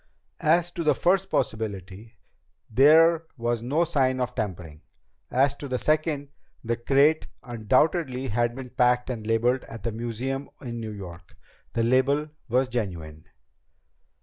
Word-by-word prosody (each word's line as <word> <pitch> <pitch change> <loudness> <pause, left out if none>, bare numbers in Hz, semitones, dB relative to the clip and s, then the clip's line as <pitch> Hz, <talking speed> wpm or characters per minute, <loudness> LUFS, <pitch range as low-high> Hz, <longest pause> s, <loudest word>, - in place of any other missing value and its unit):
"As 170 +2 +3
to 170 - -4
the 155 - +3
first 190 +2 +2
possibility, 105 0 -3 0.6
there 160 +6 +5
was 120 -1 -1
no 145 +8 +1
sign 135 -6 +1
of 125 0 -2
tampering. 90 -9 -5 0.5
As 135 +2 +2
to 145 - -6
the 130 -1 -1
second, 155 -1 0 0.3
the 115 0 0
crate 140 +6 +3 0.2
undoubtedly 130 - 0
had 120 +2 0
been 130 -2 -8
packed 125 0 +2
and 110 -3 -6
labeled 120 +3 +2
at 115 -3 -10
the 115 - -1
museum 120 +5 -4
in 120 -3 -6
New 110 -1 -5
York. 90 -4 -10 0.4
The 115 - +1
label 135 +5 +2 0.2
was 130 +3 +2
genuine." 85 -11 -5
125 Hz, 140 wpm, -26 LUFS, 115-145 Hz, 0.6 s, there